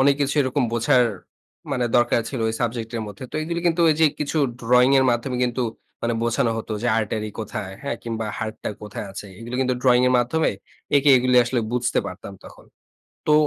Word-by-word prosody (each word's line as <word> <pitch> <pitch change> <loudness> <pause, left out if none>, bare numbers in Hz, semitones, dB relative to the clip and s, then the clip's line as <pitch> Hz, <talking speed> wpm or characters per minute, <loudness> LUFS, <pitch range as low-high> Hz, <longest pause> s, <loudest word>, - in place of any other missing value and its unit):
অনেক 140 +1 +5
কিছু 140 +1 +1
এরকম 130 +1 0
বোঝার 125 +2 +3 0.7
মানে 125 - 0
দরকার 120 -1 +3
ছিল 130 - -4
ওই 110 - -2
সাবজেক্ট 115 -1 -2
এর 115 - -2
মধ্যে। 105 +5 -9
তো - - -18
এইগুলি 170 +2 -3
কিন্তু 170 0 +2
ওইযে 160 +1 +3 0.2
কিছু 150 +2 -1 0.2
ড্রয়িং 125 +2 +4
এর 130 - +4
মাধ্যমে 120 +2 -1
কিন্তু 125 +1 -1 0.4
মানে 115 0 0
বোঝানো 115 0 +1
হতো 110 - -5
যে, - - 0
artery 110 0 -2
কোথায়? 110 -3 -5
হ্যাঁ, 140 -4 -3
কিংবা 115 -1 -3
হার্টটা 110 -1 -4
কোথায় 105 0 -6
আছে। 100 - -7
এইগুলি 120 +2 -6
কিন্তু 130 -1 +1
ড্রয়িং 125 -1 +5
এর - - +2
মাধ্যমে 140 +7 +1 0.5
এঁকে 140 +1 +3
এইগুলি 125 0 +2
আসলে 120 0 0
বুঝতে 125 -1 0
পারতাম 90 +2 -8
তখন। - - -14 0.6
তো 150 - +3
120 Hz, 190 wpm, -23 LUFS, 115-130 Hz, 0.7 s, অনেক